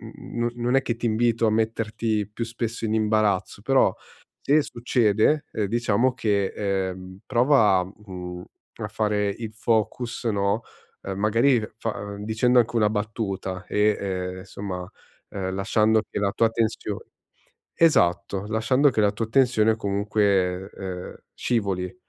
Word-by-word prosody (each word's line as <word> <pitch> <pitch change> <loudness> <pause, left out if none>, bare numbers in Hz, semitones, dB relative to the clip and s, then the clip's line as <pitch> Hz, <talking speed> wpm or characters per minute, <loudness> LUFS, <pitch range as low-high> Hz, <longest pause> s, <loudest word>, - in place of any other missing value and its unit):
n 120 0 -3
non 120 +2 0
è 135 - +4
che 120 - -1
ti 120 0 -2
invito 115 0 +2
a - - +2
metterti 110 -1 -1
più 115 +2 -3
spesso 115 0 -4
in 110 - -1
imbarazzo, 110 -3 +1
però - - +3 0.5
se 150 +2 +4
succede 120 +3 +1 0.2
diciamo 120 +3 +1
che, 105 -6 +1
ehm, 95 -2 -3
prova, 120 -7 +4
mhmm, 90 -2 -8 0.4
a - - -3
fare 105 -1 0
il 110 +2 -5
focus, 115 +2 -1
no, 100 0 +1 0.5
magari 115 +5 +3 0.2
fa 105 -2 -4
dicendo 110 +4 +2
anche 120 0 +1
una 105 -2 +3
battuta 105 -3 -3
e, 105 +2 +2
ehm, 95 -2 -3
insomma, 95 -1 -6 0.4
ehm, 95 -1 -4
lasciando 110 +3 +2
che - - -3
la 100 -1 +1
tua 115 +1 +3
tensione 110 -2 -2 0.7
esatto, 100 - +3
lasciando 120 +6 +3
che 110 - 0
la 105 -1 +4
tua 110 +2 -3
tensione 110 -3 +3
comunque, 100 -3 0
ehm, 90 -2 -7 0.2
scivoli. 100 -5 -1
110 Hz, 135 wpm, -24 LUFS, 100-115 Hz, 0.7 s, è